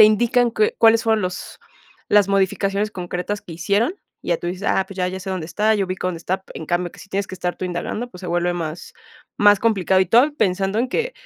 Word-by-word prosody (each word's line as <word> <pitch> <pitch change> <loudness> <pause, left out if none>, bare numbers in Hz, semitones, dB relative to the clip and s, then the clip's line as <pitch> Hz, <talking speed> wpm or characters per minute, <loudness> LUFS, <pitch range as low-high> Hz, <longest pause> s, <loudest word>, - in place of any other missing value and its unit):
te 215 - +12
indican 240 +3 +3
qué 430 - +1
cuáles 225 0 +5
fueron 220 -1 +2
los 180 0 -5 0.5
las 205 -1 +4
modificaciones 195 +1 +1
concretas 180 +1 -4
que 170 - -10
hicieron, 205 - +1 0.3
y - - -9
ya 170 - +2
tú - - -6
dices: 185 +2 -5
"Ah, 190 - +2
pues, 195 - -10
ya, 180 0 +1
ya 190 +1 -5
sé 190 - -8
dónde 185 -4 -3
está, 210 +6 +1
ya 200 -2 +1
ubico 185 0 -4
dónde 175 - -4
está". 190 +3 -3
En - - -6
cambio, 175 0 -1
que - - -16
si 200 - -13
tienes 200 +1 -1
que - - -6
estar 180 0 -3
tú - - -5
indagando, 180 +7 -4
pues, 180 - -12
se - - -5
vuelve 175 +1 +1
más 165 -1 -6 0.4
más 205 -1 +6
complicado 190 -4 +2
y 185 - +2
todo, 250 - +4
pensando 195 -1 +1
en 250 - +1
que, 475 - -1
195 Hz, 245 wpm, -21 LUFS, 180-215 Hz, 0.5 s, te